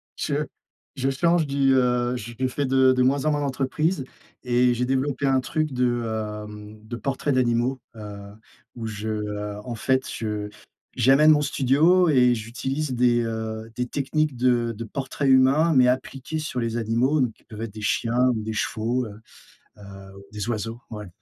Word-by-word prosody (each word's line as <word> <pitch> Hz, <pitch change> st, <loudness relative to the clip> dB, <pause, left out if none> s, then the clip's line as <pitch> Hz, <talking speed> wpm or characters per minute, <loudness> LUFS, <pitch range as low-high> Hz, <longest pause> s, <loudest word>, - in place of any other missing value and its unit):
Je -, -, -2 dB, 0.6 s
je 135 Hz, +1 st, 0 dB
change 165 Hz, +4 st, +2 dB
du, 140 Hz, -1 st, +2 dB
heu, 125 Hz, -1 st, +2 dB
je 120 Hz, +2 st, -4 dB
fais 140 Hz, +1 st, -2 dB
de 130 Hz, 0 st, +4 dB
de 130 Hz, -, +1 dB
moins 135 Hz, +3 st, +2 dB
en 155 Hz, -, +3 dB
moins 145 Hz, -, 0 dB
d'entreprises, 140 Hz, +3 st, -1 dB, 0.4 s
et 125 Hz, 0 st, +3 dB
j'ai 125 Hz, +1 st, 0 dB
développé 135 Hz, +2 st, -1 dB
un 135 Hz, -1 st, +3 dB
truc 155 Hz, +2 st, -2 dB
de, 120 Hz, -1 st, +1 dB
hem, 105 Hz, -1 st, -6 dB
de 120 Hz, -, -5 dB
portrait 135 Hz, +4 st, -2 dB
d'animaux, 125 Hz, 0 st, +1 dB, 0.2 s
heu, 105 Hz, -2 st, -8 dB, 0.6 s
où 115 Hz, -2 st, -6 dB
je, 110 Hz, -1 st, -5 dB
heu, 105 Hz, -1 st, -3 dB
en 120 Hz, -, -4 dB
fait, 130 Hz, +3 st, 0 dB
je 105 Hz, -2 st, -3 dB, 0.5 s
j'amène 135 Hz, +5 st, +5 dB
mon 150 Hz, -1 st, +4 dB
studio, 155 Hz, +7 st, +3 dB
et 125 Hz, -4 st, +4 dB
j'utilise 130 Hz, +5 st, -3 dB
des, 120 Hz, -1 st, +3 dB
heu, 110 Hz, 0 st, -4 dB
des 125 Hz, 0 st, -2 dB
techniques 145 Hz, +1 st, -1 dB
de 120 Hz, -1 st, +2 dB
de 115 Hz, -, -5 dB
portraits 135 Hz, +4 st, -3 dB
humains, 135 Hz, +5 st, +5 dB
mais 130 Hz, -3 st, +5 dB
appliquées 130 Hz, +4 st, -2 dB
sur 150 Hz, -5 st, -3 dB
les 115 Hz, -1 st, -2 dB
animaux, 120 Hz, +6 st, +1 dB
donc 120 Hz, -3 st, 0 dB
qui -, -, -30 dB
peuvent 110 Hz, -1 st, -8 dB
être 110 Hz, -3 st, -6 dB
des 110 Hz, -, -8 dB
chiens 120 Hz, +4 st, +1 dB
ou 110 Hz, -, -4 dB
des 110 Hz, 0 st, -4 dB
chevaux, 115 Hz, +4 st, -1 dB
heu 105 Hz, 0 st, -11 dB, 0.6 s
heu, -, -, -14 dB, 0.4 s
ou 100 Hz, -, -12 dB
des 105 Hz, 0 st, -5 dB
oiseaux, 115 Hz, 0 st, -3 dB
ouais. 105 Hz, -2 st, -7 dB
125 Hz, 180 wpm, -24 LUFS, 115-135 Hz, 0.6 s, j'amène